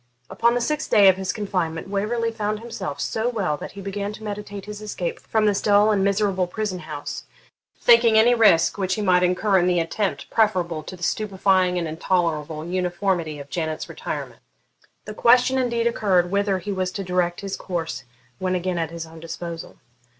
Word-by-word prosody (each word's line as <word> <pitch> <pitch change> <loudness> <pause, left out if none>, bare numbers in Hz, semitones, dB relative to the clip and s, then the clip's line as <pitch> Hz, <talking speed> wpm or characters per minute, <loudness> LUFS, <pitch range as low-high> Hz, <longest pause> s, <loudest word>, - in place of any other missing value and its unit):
Upon 235 +5 +2
the 245 - 0
sixth 300 +5 -1
day 200 -3 +7
of 185 - +3
his 190 -1 -2
confinement 180 -6 -3
Waverley 220 +4 -1
found 215 -1 -2
himself 205 -10 -6
so 225 +2 -1
well 195 -10 -1
that - - -8
he 200 - -8
began 200 +1 -4
to 215 - -11
meditate 205 -1 -6
his 210 0 -8
escape 190 -5 -4
from 220 -1 0
this 205 -1 +2
dull 205 +1 +4
and 200 -2 +2
miserable 195 -2 +1
prison 200 -1 -3
house, 150 -3 -6 0.5
thinking 230 -2 +6
any 235 +3 +6
risk 200 -6 +4
which 190 -1 0
he 215 - -3
might 180 -2 +4
incur 185 +2 +2
in 175 - +2
the 180 -1 +2
attempt 165 -3 -2
preferable 180 -7 +1
to 170 - -9
the 175 - -11
stupefying 190 -2 +1
and 170 -2 -1
intolerable 160 -2 -1
uniformity 175 -2 -1
of 140 -1 -10
Janet's 160 0 -3
retirement. - - -6 0.6
The 215 - -6
question 250 +4 +4
indeed 235 -2 0
occurred, 190 -6 +2
whither 200 -1 +1
he 200 +3 -5
was 185 -1 -1
to 200 - -4
direct 180 -1 -1
his 195 -1 -4
course 165 -7 -4 0.4
when 185 0 0
again 180 -1 -1
at 165 -2 -1
his 165 0 -6
own 160 0 -13
disposal. 165 0 -7
190 Hz, 185 wpm, -23 LUFS, 175-210 Hz, 0.6 s, day